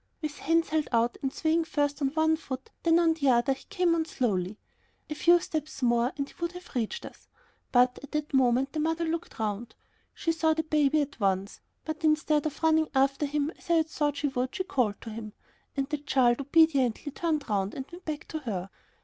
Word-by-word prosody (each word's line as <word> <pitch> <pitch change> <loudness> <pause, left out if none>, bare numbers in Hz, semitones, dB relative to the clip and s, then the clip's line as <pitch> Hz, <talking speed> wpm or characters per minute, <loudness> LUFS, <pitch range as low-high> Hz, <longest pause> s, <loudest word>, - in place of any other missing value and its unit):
With 305 -2 -5
hands 330 +3 +2
held 315 -1 0
out 235 0 +2
and 270 - -1
swaying 320 +2 +1
first 290 -2 -1
on 275 - +3
one 315 0 +3
foot, 265 -4 -7
then 330 0 +4
on 335 -1 +4
the 285 -4 +1
other, 245 +2 +3
he 265 - -13
came 360 -4 +2
on 325 -1 +1
slowly. 210 - -1 0.5
A - - +1
few 345 +3 +5
steps 310 -4 -5
more 240 +1 +3
and 280 -1 -2
he - - -16
would 340 +1 -1
have 360 0 -11
reached 245 - -2
us, - - -12 0.4
but 250 0 +4
at 285 - -11
that 300 -1 -2
moment 260 +1 +3
the 310 - -2
mother 325 +2 0
looked 330 +1 -4
round. 220 +1 -3 0.4
She 330 - 0
saw 320 -1 +2
her 320 - 0
baby 305 -1 +2
at 285 -2 -5
once. 195 -1 -1 0.2
But 315 0 -5
instead 305 -1 +2
of 310 +2 -8
running 315 -1 +3
after 275 +2 +2
him 295 +1 -1
as - - -18
I - - +4
had 320 -1 +3
thought 295 -2 -1
she 290 - 0
would, 255 -1 -2
she 375 - -1
called 250 - 0
to 225 - -7
him, 215 -1 -7 0.4
and 270 -1 0
the 300 0 -2
child 265 -3 +2
obediently 285 -3 +3
turned 310 -1 -1
round 200 -2 -1
and 265 - -5
went 350 +1 -11
back 310 0 -4
to 315 - -3
her. 195 -9 -4
290 Hz, 220 wpm, -28 LUFS, 250-320 Hz, 0.5 s, few